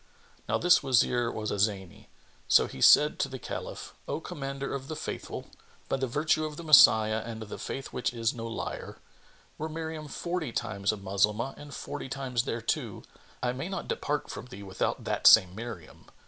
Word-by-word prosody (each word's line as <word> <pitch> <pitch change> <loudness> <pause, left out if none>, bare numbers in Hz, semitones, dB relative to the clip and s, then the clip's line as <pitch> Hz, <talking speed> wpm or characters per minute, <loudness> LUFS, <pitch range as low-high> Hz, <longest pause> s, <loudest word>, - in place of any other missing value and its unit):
'" - - -28
Now - - +2
this 180 0 +5
Wazir 120 -3 +2
was 105 -1 -4
a 100 - -2
Zany: 95 -3 -2 0.4
so - - +6
he 65 - -9
said 150 0 +6
to 135 - 0
the 130 - -6
Caliph, - - -7
"O - - -2
Commander 135 -1 -5
of 135 -1 -5
the 155 - -5
Faithful, - - -6 0.4
by - - 0
the 135 0 -1
virtue 155 +5 +1
of 155 -1 -5
the 170 - -7
Messiah 110 -7 +7
and 115 -1 -7
the 105 - -8
Faith 135 - -6
which 125 - -1
is 115 -2 -1
no 115 -1 -6
liar, 115 - -5 0.6
were 155 +1 -3
Miriam 160 -1 -5
forty 170 -1 -3
times 100 -2 -1
a 110 - -5
Moslemah 105 +6 0
and 145 -1 -10
forty 145 -2 -6
times 125 -2 -2
thereto, 115 0 -3 0.4
I 125 0 +1
may 135 +8 -5
not 195 - -4
depart 145 -1 -2
from - - -8
thee 100 -5 -10
without 95 -1 -2
that - - +2
same 90 -1 +8
Miriam! 110 -6 -9
125 Hz, 190 wpm, -29 LUFS, 110-145 Hz, 0.6 s, same